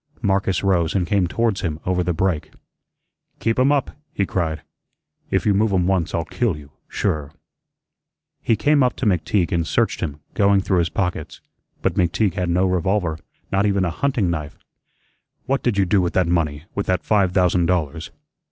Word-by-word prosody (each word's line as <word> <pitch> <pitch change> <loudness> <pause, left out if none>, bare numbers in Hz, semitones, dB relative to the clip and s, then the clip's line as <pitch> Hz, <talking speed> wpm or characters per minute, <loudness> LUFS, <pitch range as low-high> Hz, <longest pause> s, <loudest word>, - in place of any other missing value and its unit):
Marcus 95 -2 +1
rose 90 -4 +1
and 90 -2 +1
came 95 0 +1
towards 115 +1 0
him 80 -4 -3
over 90 0 +1
the 90 - 0
break. 85 -2 -1 0.9
"Keep 115 +2 0
'em 130 +3 +4
up," 145 -3 +1 0.2
he 100 - 0
cried. 80 -5 -2 0.7
"If - - 0
you 105 - +4
move 105 +2 +2
'em 90 -2 +2
once 95 -3 0
I'll 85 -1 -1
kill 115 -10 -1
you, 70 -2 -13 0.2
sure." 75 -2 -2 1.1
He 115 - +2
came 145 +4 +3
up 125 -1 +2
to - - -3
McTeague 95 -1 +1
and 85 -3 0
searched - - +1
him, 75 0 -4
going 100 -1 +3
through 95 -2 +1
his 85 -1 +1
pockets; 90 -5 -3 0.4
but - - +1
McTeague 90 +2 +1
had 90 -1 -2
no 90 +2 +2
revolver; 90 -2 0 0.3
not 100 +2 +2
even 100 -2 +1
a 85 - -1
hunting 120 -7 0
knife. 75 -4 -5 0.9
"What 135 +1 0
did 120 -5 0
you 100 - +3
do 100 +1 +3
with 90 - -1
that 95 - +3
money, 80 -4 0
with 100 - -3
that 90 -3 0
five 100 -2 +2
thousand 90 -2 +3
dollars?" 80 -3 -1
90 Hz, 185 wpm, -21 LUFS, 85-100 Hz, 1.1 s, em